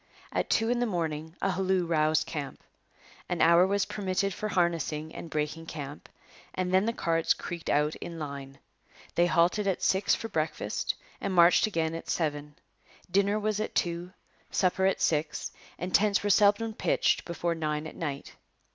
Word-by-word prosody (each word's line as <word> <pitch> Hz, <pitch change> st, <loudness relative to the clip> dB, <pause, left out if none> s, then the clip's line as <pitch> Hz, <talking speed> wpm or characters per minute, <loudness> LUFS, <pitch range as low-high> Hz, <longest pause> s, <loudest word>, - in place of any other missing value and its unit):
At -, -, -1 dB
two 225 Hz, +1 st, +2 dB
in 245 Hz, -, +1 dB
the 245 Hz, -, +1 dB
morning 160 Hz, -4 st, -3 dB
a 195 Hz, -, +2 dB
halloo 185 Hz, -1 st, +1 dB
roused 155 Hz, -1 st, +2 dB
camp. 150 Hz, -4 st, -6 dB, 0.7 s
An 175 Hz, -, -1 dB
hour 170 Hz, +3 st, +6 dB
was 200 Hz, 0 st, +1 dB
permitted 195 Hz, -1 st, -1 dB
for 215 Hz, -, -4 dB
harnessing 165 Hz, -4 st, 0 dB
and 165 Hz, -, -8 dB
breaking 155 Hz, +2 st, -3 dB
camp, 145 Hz, -2 st, -7 dB, 0.5 s
and 185 Hz, 0 st, -1 dB
then 190 Hz, +3 st, +4 dB
the -, -, +2 dB
carts 165 Hz, -5 st, +1 dB
creaked 170 Hz, -2 st, -6 dB
out 150 Hz, +1 st, +2 dB
in 170 Hz, -1 st, -7 dB
line. 140 Hz, -3 st, -7 dB, 0.6 s
They 175 Hz, +1 st, +3 dB
halted 175 Hz, +4 st, +2 dB
at 190 Hz, -, -1 dB
six 190 Hz, +1 st, +3 dB
for 225 Hz, -, -5 dB
breakfast 160 Hz, -7 st, -2 dB, 0.3 s
and 200 Hz, -, -2 dB
marched 175 Hz, +5 st, +6 dB
again 165 Hz, -5 st, -1 dB
at 165 Hz, -, -7 dB
seven. 150 Hz, -2 st, -2 dB, 0.6 s
Dinner 200 Hz, +2 st, +2 dB
was 215 Hz, 0 st, -1 dB
at 215 Hz, -, -3 dB
two, 175 Hz, +1 st, -1 dB, 0.4 s
supper 190 Hz, 0 st, +2 dB
at 195 Hz, -, 0 dB
six, 150 Hz, -1 st, 0 dB, 0.3 s
and 180 Hz, +2 st, -5 dB
tents 205 Hz, -1 st, +3 dB
were 205 Hz, -, +2 dB
seldom 210 Hz, +3 st, +4 dB
pitched -, -, +1 dB
before 170 Hz, 0 st, -2 dB
nine 155 Hz, -2 st, -2 dB
at -, -, -8 dB
night. 145 Hz, -4 st, -5 dB
170 Hz, 170 wpm, -29 LUFS, 155-195 Hz, 0.7 s, hour